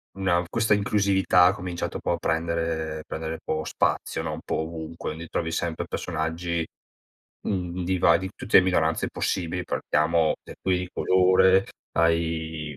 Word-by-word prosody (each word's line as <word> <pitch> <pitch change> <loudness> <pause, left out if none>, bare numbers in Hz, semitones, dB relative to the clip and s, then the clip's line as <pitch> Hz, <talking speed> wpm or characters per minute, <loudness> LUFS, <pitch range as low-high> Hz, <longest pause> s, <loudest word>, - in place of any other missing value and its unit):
una 95 -2 +1
questa 110 +1 +2
inclusività 100 -3 +3
ha 90 - +5
cominciato 90 -4 -4
po' - - -2
a - - +1
prendere 80 -1 -2
prendere 80 0 -4
un 80 - -7
po' 80 0 -2
spazio - - -1
no, - - -3
un - - -6
po' - - -1
ovunque 80 0 -5
quindi 80 +2 -8
trovi 80 0 -2
sempre 85 0 -2
personaggi, 85 +1 -2 0.9
mhmm, 90 -2 -2
di 95 0 0
va 85 -1 +5
di 95 +2 -5
tutte 105 - +4
le 95 - +6
minoranze 80 -3 +1
possibili, 90 0 -2
partiamo 80 +2 +1
per - - -11
cui 90 -1 +2
di 90 - -4
colore 95 +1 +4 0.3
ai 80 -3 0
85 Hz, 160 wpm, -25 LUFS, 80-90 Hz, 0.9 s, le